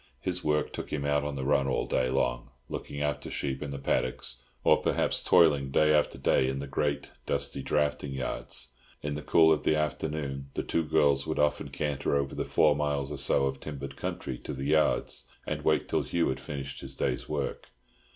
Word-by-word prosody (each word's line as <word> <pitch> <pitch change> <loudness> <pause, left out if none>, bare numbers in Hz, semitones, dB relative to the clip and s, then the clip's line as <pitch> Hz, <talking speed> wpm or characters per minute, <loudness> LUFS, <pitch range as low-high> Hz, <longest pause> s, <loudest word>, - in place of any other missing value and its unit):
His 90 +4 -2
work 75 0 +1
took - - -6
him 70 -2 -2
out 70 0 +2
on 75 -1 -3
the 65 -1 -3
run 70 -1 +3
all 65 - 0
day 65 0 +1
long, 60 -1 0 0.2
looking 70 - -5
after 75 -2 -2
sheep 65 -1 -3
in 75 - -4
the 70 - -4
paddocks, 65 -1 -1 0.3
or - - +6
perhaps - - +1
toiling 70 -5 +5
day 75 +3 +4
after 75 -3 +2
day 65 0 +3
in 65 - -2
the 70 - -4
great, 70 +1 -1 0.2
dusty - - -1
drafting 75 -1 0
yards. 65 -1 -4 0.3
In 75 0 -2
the 75 - -4
cool 80 0 +5
of 75 - -1
the 75 - +2
afternoon 75 -3 -2
the - - -1
two 80 - 0
girls 70 -2 +3
would 80 - -2
often 75 0 +1
canter 75 -2 -1
over 70 -1 0
the - - -2
four 75 -2 +4
miles 75 -1 -1
or 75 - -4
so 70 0 +3
of 70 0 -2
timbered 70 -2 -6
country 65 -2 -4
to 75 - -6
the 70 0 -4
yards, 75 +2 +2 0.2
and - - -3
wait - - +2
till - - +1
Hugh 85 -1 0
had 65 - -2
finished 70 0 -6
his 65 0 -6
day's - - -1
work. 75 -3 -3
70 Hz, 205 wpm, -29 LUFS, 70-75 Hz, 0.3 s, or